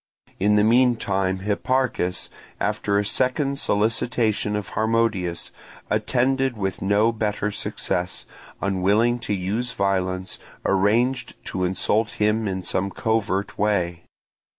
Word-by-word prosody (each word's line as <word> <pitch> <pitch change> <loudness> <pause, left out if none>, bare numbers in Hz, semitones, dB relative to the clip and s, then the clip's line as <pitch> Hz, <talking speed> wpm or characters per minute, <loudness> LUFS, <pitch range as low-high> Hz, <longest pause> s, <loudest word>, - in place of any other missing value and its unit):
In 105 +2 +3
the 105 - +4
meantime 105 -6 +2
Hipparchus, 105 -2 0 0.3
after 100 0 0
a 105 - +1
second 135 +5 0
solicitation 110 -1 +1
of 105 -2 -3
Harmodius, 110 -6 0 0.4
attended 130 0 +1
with 95 -2 -3
no 100 +4 +3
better 105 -2 -1
success, 90 -2 -2 0.4
unwilling 100 +5 +2
to 110 - -3
use 105 +7 -2
violence, 95 -1 -1 0.3
arranged 120 +6 +2
to 95 - -3
insult 105 +4 +1
him 105 +1 +1
in 95 -1 -3
some 95 +2 0
covert 100 -1 -1
way. 90 -5 +1
105 Hz, 110 wpm, -23 LUFS, 95-115 Hz, 0.4 s, the